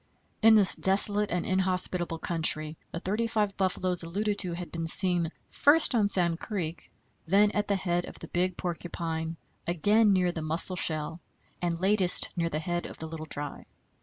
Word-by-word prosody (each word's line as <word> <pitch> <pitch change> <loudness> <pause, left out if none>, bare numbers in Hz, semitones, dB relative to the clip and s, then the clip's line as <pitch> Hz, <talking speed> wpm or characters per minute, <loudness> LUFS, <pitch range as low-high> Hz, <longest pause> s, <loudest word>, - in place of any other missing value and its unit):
In 225 0 +6
this 205 -3 +9
desolate 205 +2 +4
and 180 0 -3
inhospitable 185 -2 -2
country 160 -2 0 0.2
the 170 - -6
thirty 210 +6 -2
five 210 -3 -2
buffaloes 185 -1 -1
alluded 200 +5 -3
to 180 -3 0
had 175 0 -8
been 165 -1 -5
seen, 175 -1 +4 0.2
first 295 0 +2
on 210 -4 +1
Sand 175 -4 +2
Creek, 175 -6 -6 0.4
then 205 +4 +3
at 210 -1 -2
the 200 - 0
head 175 -2 -2
of - - -11
the - - -10
Big 180 0 -2
Porcupine, 165 -2 -5 0.3
again 205 +6 +2
near 180 -2 +1
the 165 - -7
Musselshell, 160 0 +1 0.4
and 170 -1 -3
latest 190 -1 +2
near 170 -2 -2
the 155 - -4
head 175 +2 -4
of - - -11
the 160 - -6
Little 160 0 -9
Dry. 145 -1 -7
180 Hz, 170 wpm, -27 LUFS, 165-200 Hz, 0.4 s, this